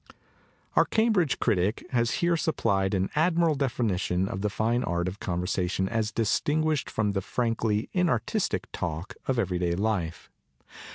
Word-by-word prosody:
Our - - +5
Cambridge 215 - +2
critic 100 +3 0
has 120 -2 +2 0.2
here 170 0 +3
supplied 100 - +1
an 95 0 0
admirable 165 +1 +3
definition 105 -9 0
of 95 - -4
the 105 - 0
line 120 +3 +1
art 85 0 -1
of 95 +3 -5
com 90 -1 -2
tion 95 0 0
as 110 0 -1
distinguished 145 +7 +1
from 105 -2 0
the 100 -1 -1
frankly 115 -1 -1
inartistic 170 -11 0
talk 85 +1 -4
of 130 - +1
every 95 -6 0
day 85 -1 0
life. 95 -5 -2
110 Hz, 150 wpm, -27 LUFS, 95-135 Hz, 0.2 s, Our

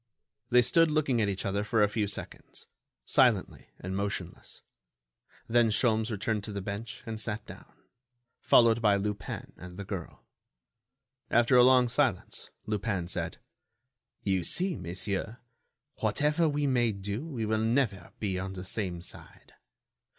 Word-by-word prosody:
They 125 0 +6
stood 165 +6 +4
looking 145 -6 +1
at 105 - +1
each 95 -1 -3
other 100 +1 0
for 105 0 +2
a - - +5
few 105 0 -1
seconds, 100 - -7 0.4
silently - - +2
and 95 +1 -5
motionless. 100 -3 -5 0.8
Then 120 0 +4
Sholmes 110 0 +2
returned 105 -1 -2
to 110 - -6
the 100 - -4
bench 100 +4 -6
and 110 -1 -5
sat 105 -1 -3
down, - - -12 0.7
followed 115 -1 +5
by 105 -3 +4
Lupin 100 -1 -4
and 90 0 -10
the 100 - -6
girl. 95 -4 -7 1.0
After 120 +2 +4
a 125 - +8
long 125 -1 +6
silence, 120 -5 -1 0.2
Lupin 100 -4 -2
said: - - -3 0.9
"You 95 -3 +1
see, 180 - +1
monsieur, 95 +5 -4 0.6
whatever 150 +2 +2
we 145 0 0
may 120 -4 +2
do, 100 +5 -4
we 130 -9 -4
will 110 0 0
never 110 -3 0
be 95 -4 -2
on 95 +1 -4
the 90 -1 -6
same 95 -3 -2
side. - - -9
110 Hz, 145 wpm, -29 LUFS, 100-120 Hz, 1.0 s, a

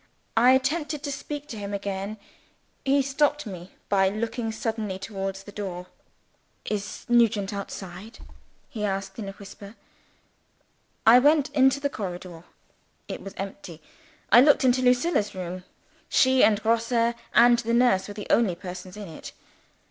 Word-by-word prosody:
I 245 +3 +6
attempted 295 +3 0
to 285 - -3
speak 290 +1 -6
to 225 - -6
him 200 0 -4
again 200 +1 -4 0.7
he 275 +1 +3
stopped 290 +1 +1
me 185 -3 -9
by 195 -1 +3
looking 225 +2 -3
suddenly 220 -3 -3
towards 195 -1 -5
the 205 - -11
door. 185 -3 -6 0.8
"Is 205 -1 -4
Nugent 225 -4 +2
outside?" 195 +1 -7 0.5
he 215 -3 -6
asked 195 +1 -3
in 200 -3 -5
a - - -8
whisper. 200 +1 -12 1.3
I 235 +3 +8
went 290 +2 +3
into 265 -1 +3
the 285 - 0
corridor. 180 -5 -7 0.6
It - - -6
was 195 0 -9
empty. 195 -4 -7 0.5
I 240 - +9
looked 285 0 +5
into 255 0 +3
Lucilla's 250 - +2
room. 180 0 -6 0.4
She 260 0 +4
and 215 -1 +3
Grosse 230 +1 +2 0.2
and 240 0 +6
the 230 0 -2
nurse 240 -6 +3
were 205 - -8
the 210 - -6
only 215 -7 +3
persons 180 +1 -9
in 205 -2 -7
it. 160 - -10
215 Hz, 150 wpm, -25 LUFS, 195-250 Hz, 1.3 s, I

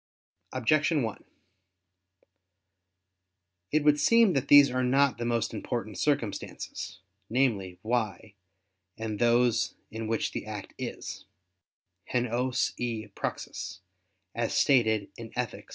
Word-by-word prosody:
Objection 145 +4 +2
1: 110 -2 -4 2.5
It 155 0 +2
would 150 0 +4
seem 230 -1 +5
that 135 0 0
these 145 -2 +8
are 130 0 0
not 135 0 +3
the 120 - -2
most 115 -2 0
important - - -4
circumstances, 95 - -2 0.3
namely, 110 -8 +1
"why" 110 -4 -2 0.6
and 110 -2 -4
those 120 -1 +3 0.2
"in 110 0 -4
which 115 -1 0
the - - -5
act - - -7
is, - - -6 0.9
[*_hen 125 0 +1
ois 125 0 0
e 115 -3 -3
praxis_]" 95 0 -5 0.5
as 115 -1 -1
stated 110 -7 +3
in 115 -1 -8
_Ethic. 125 -2 -4
120 Hz, 115 wpm, -28 LUFS, 110-135 Hz, 2.5 s, these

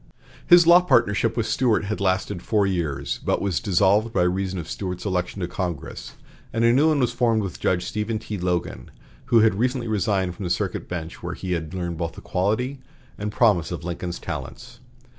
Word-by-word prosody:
His 175 -1 +8
law 170 +2 +8
partnership 115 - +2
with 115 - +1
Stuart 115 -2 +1
had 105 0 -3
lasted 95 -2 0
four 105 0 +1
years, 85 -8 -2
but - - +1
was 100 -5 0
dissolved 100 +4 +2
by 90 - +2
reason 95 +1 -1
of 85 -3 -5
Stuart's 90 0 -5
election 95 0 -2
to 85 - -1
Congress, 90 -4 -5 0.4
and 115 +1 +1
a 115 - +5
new 145 +5 +4
one 155 -2 +2
was 125 -3 +2
formed 115 -3 +2
with 95 - -6
Judge 90 -1 0
Stephen 110 +1 -2
T. 105 -2 -6
Logan, 90 -8 -2 0.4
who 120 -3 +4
had 110 -2 +4
recently 125 0 0
resigned 100 -4 0
from 95 - -7
the - - -2
circuit - - -2
bench, 85 -2 -6
where 90 0 -5
he 95 - -5
had 85 0 -3
learned 85 -3 -4
the 85 -1 -4
quality 110 +9 -1 0.4
and 105 0 -3
promise 105 -8 +2
of 85 - -5
Lincoln's 85 0 -4
talents. - - -7
100 Hz, 195 wpm, -24 LUFS, 90-115 Hz, 0.4 s, His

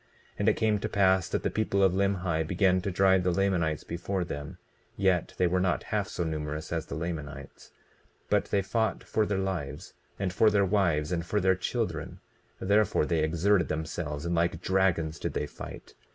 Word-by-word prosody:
20:11 - - -34 0.3
And - - +4
it - - +2
came 110 -2 +1
to - - -3
pass 95 -3 +3
that - - -1
the - - 0
people 100 -2 +1
of 95 -2 +4
Limhi 95 -4 +1
began 90 +1 +2
to 100 - -2
drive 95 0 +4
the 90 - +1
Lamanites 90 -4 +1
before 90 +2 -3
them; 75 -3 -6 0.4
yet 95 -3 +1
they 90 - +3
were 90 +1 +2
not 90 -1 +1
half 105 -2 +1
so 85 - -3
numerous 75 -1 -4
as 80 -1 -2
the - - -5
Lamanites. 75 -4 -6 0.6
But - - +2
they 100 -1 0
fought 110 +3 -1
for 110 -1 0
their 100 - 0
lives, 90 -4 -4 0.2
and 95 -2 -2
for 110 +4 +5
their 100 -1 +3
wives, 85 -6 +1
and 85 -2 -1
for 105 +5 0
their 95 -1 +4
children; 90 - -3 0.4
therefore 100 -4 +2
they 80 0 +1
exerted 85 +4 +2
themselves 80 -1 -4
and 85 - -1
like 85 0 +1
dragons 85 -4 +1
did - - -3
they - - -1
fight. - - -10
90 Hz, 195 wpm, -28 LUFS, 80-95 Hz, 0.6 s, for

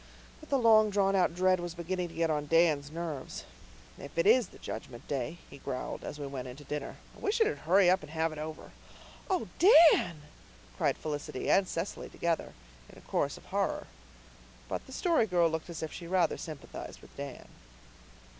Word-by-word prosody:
But 310 - -15
the 275 - +3
long 220 -3 +6
drawn 195 -1 +2
out 180 -3 +2
dread 185 0 +3
was 175 -1 -5
beginning 180 +1 -2
to 165 - -13
get 165 -1 +1
on 150 -1 -1
Dan's 155 -3 +3
nerves. 160 -5 -5 0.6
"If 140 - -10
it 165 - +3
is 230 +1 +5
the - - -16
Judgment 120 -3 -8
Day," 140 +4 -3
he - - -12
growled, 130 -1 -5
as - - -6
we 145 - -5
went 135 -2 -5
in 125 - -8
to 145 - -12
dinner, 145 0 -5 0.2
"I - - -15
wish 415 +3 0
it'd 440 -1 +2
hurry 190 0 +6
up 185 +1 +4
and 150 - -11
have 160 +1 0
it 155 - -7
over." 155 0 -7 0.6
"Oh, 370 -2 0
Dan!" 320 - +6 0.5
cried - - +1
Felicity 145 -4 -3
and 195 -1 +4
Cecily 170 +3 -4
together, 170 -1 -2 0.4
in - - -15
a - - -13
chorus - - -1
of - - -16
horror. - - -1 0.8
But - - -4
the - - -12
Story 320 -4 +2
Girl 175 -3 +3
looked 160 +1 -3
as 165 -1 -5
if 160 - -5
she 170 - -7
rather 175 -2 +2
sympathized 155 -4 -8
with - - -17
Dan. 140 -2 -7
170 Hz, 195 wpm, -31 LUFS, 150-195 Hz, 0.8 s, long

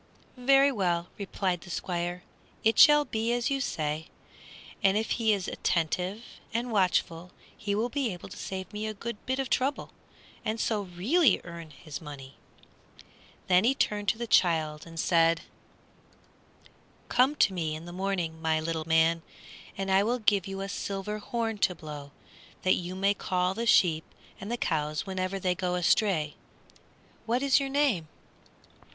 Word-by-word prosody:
"Very 275 +2 +5
well," 175 -7 0
replied 190 -3 -2
the 175 - -12
Squire, 175 0 -3 0.4
"it 225 +1 +3
shall 295 0 +8
be 225 -2 -1
as 240 +2 0
you 275 0 0
say, 155 - -2 0.7
and 195 +1 +4
if 220 - -1
he 225 -2 +2
is 195 -3 0
attentive 180 +6 -1 0.3
and 235 +1 -2
watchful 180 -4 +1 0.3
he 205 -1 -2
will 220 +3 +1
be 265 -2 -1
able 180 -1 -8
to 195 - -10
save 190 -1 -6
me 210 +1 -3
a 215 - -4
good 235 +1 -6
bit 260 +1 0
of 270 -1 -1
trouble 270 +4 -1 0.5
and 220 +1 -2
so 215 -2 0
really 200 - +2
earn 170 -2 -9
his 155 +1 -9
money." 140 -3 -9 1.1
Then 180 +1 +4
he 255 +4 +3
turned 205 -5 0
to 220 - +2
the 235 - -3
child 160 -7 +2
and 165 0 -8
said, 165 -1 +3 1.7
"Come 260 +4 +3
to 200 - +3
me 160 -4 -2
in 160 +2 -8
the 175 - -8
morning, 180 -4 -2
my 160 -1 +1
little 160 0 -3
man, 165 +1 +3 0.6
and 195 0 -2
I 190 +1 +5
will 235 +4 +1
give 205 -5 +2
you 195 0 -5
a 195 - -3
silver 200 +1 -4
horn 225 0 -3
to 180 - +2
blow, 150 -3 -8 0.5
that 185 - +4
you 180 +1 -3
may 195 +1 +2
call 180 -2 0
the 230 +3 -3
sheep 160 -7 +4 0.4
and 200 - -6
the 240 - -1
cows 150 -6 -1
whenever 190 0 -2
they 185 -1 +1
go 180 -1 -2
astray. 175 -3 +2 0.9
What 245 +4 +1
is 275 -1 +5
your 275 -1 -2
name?" 270 - +1
190 Hz, 165 wpm, -28 LUFS, 170-225 Hz, 1.7 s, shall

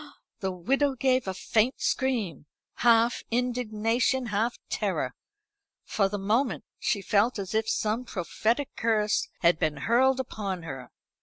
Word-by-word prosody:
The 190 -1 -2
widow 270 +10 +1
gave 255 -2 +1
a 190 - -1
faint 225 +6 +1
scream, 220 - -1 0.3
half 235 0 +4
indignation, 245 +1 0
half 225 +2 -1
terror. - - -1 0.7
For 195 -2 +1
the 205 - -3
moment 220 +7 0 0.2
she 200 -3 0
felt 215 +4 +2
as 195 -1 -5
if 220 0 +1
some 220 +4 0
prophetic 230 +7 -1
curse 215 -2 +1
had 170 -1 +4
been 150 -1 0
hurled 255 - +3
upon 200 -8 -4
her. 135 -5 -7
225 Hz, 135 wpm, -27 LUFS, 195-250 Hz, 0.7 s, half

